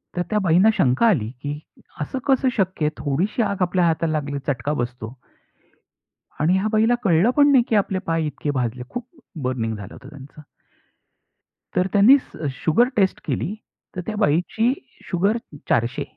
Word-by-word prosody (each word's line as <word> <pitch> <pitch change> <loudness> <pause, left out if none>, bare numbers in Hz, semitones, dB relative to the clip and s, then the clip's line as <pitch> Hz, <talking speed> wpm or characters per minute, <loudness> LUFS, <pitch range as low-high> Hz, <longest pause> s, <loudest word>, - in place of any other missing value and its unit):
तर 175 - 0
त्या 215 - +1
बाईंना 185 +2 +4
शंका 130 - +3
आली, 135 - +2
की 145 +1 -4 0.4
असं 255 - -3
कसं 265 -1 +3
शक्य 185 -5 0
आहे? - - +3
थोडीशी 165 - 0
आग 200 -2 -2
आपल्या 180 0 +2
हाताला 165 -1 +1
लागली, 145 -2 -2
चटका 145 +1 -1
बसतो. 120 -1 -6 1.2
आणि 160 +4 +3
ह्या 195 +3 0
बाईला 220 +2 +3
कळलं 180 +2 +3
पण 290 0 +6
नाही, 260 -3 +5
की 225 - +2
आपले 195 -2 +1
पाय 165 -1 0
इतके 150 0 -3
भाजले. 125 -2 -2
खूप 245 0 -6 0.4
बर्निंग 120 -3 -2
झालं 100 -3 -9
होतं 130 - -12
त्यांचं. 145 0 -13 1.3
तर 180 +1 +2
त्यांनी 215 +7 +7
स 155 - -7 0.2
शुगर 235 +10 +4
टेस्ट 195 -3 +2
केली, 180 - -2 0.4
तर 180 - -3
त्या 220 - -4
बाईची 205 - +1 0.4
शुगर 195 +6 +1 0.3
400. 120 +2 +1
170 Hz, 165 wpm, -22 LUFS, 145-210 Hz, 1.3 s, त्यांनी